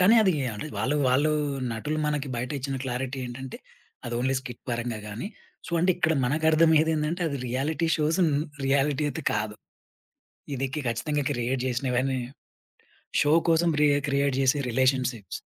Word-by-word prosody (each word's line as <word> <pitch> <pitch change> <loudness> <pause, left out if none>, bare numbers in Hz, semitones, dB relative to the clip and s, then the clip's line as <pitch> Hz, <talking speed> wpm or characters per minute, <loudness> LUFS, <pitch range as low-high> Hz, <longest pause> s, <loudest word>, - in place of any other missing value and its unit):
కానీ, 200 +6 +6
అది 190 -3 +4 0.2
అంటే, 105 - -5
వాళ్ళు 145 +3 +1
వాళ్ళు 145 +5 +3 0.4
నటులు 150 +8 -3
మనకి 150 -2 -1
బయటిచ్చిన 135 +2 -3
క్లారిటీ 130 +1 -3
ఏంటంటే, 130 +2 -7 0.5
అది 120 0 -4
ఓన్లీ 130 +2 +1
స్కిట్ 120 -3 -9
పరంగా 120 -1 -2
గాని 110 - -5 0.4
సొ - - -8 0.2
ఇక్కడ 160 -2 +2
మనకు 150 +5 0
అర్థం 160 +1 +5
అయ్యేది 160 +1 +4
ఏంటంటే, 160 +4 -1
అది 140 -2 -3
రియాలిటీ 150 +6 0
షోస్ 160 +4 +1 0.5
రియాలిటీ 140 +1 +2
అయితే 155 +1 -5
కాదు. 105 0 -2 1.0
ఇది 135 +1 -1
కి 150 - -2
ఖచ్చితంగా 145 +6 -1
క్రియేట్ 125 0 -1
చేసినవన్నీ 130 +1 0 1.0
షో 145 - +3 0.2
కోసం 165 +1 +3
రీ - - +6 0.2
క్రియేట్ 140 -1 +1
చేసే 135 +2 +3
రిలేషన్‌షిప్స్. 125 -4 0
135 Hz, 145 wpm, -26 LUFS, 125-150 Hz, 1.0 s, కానీ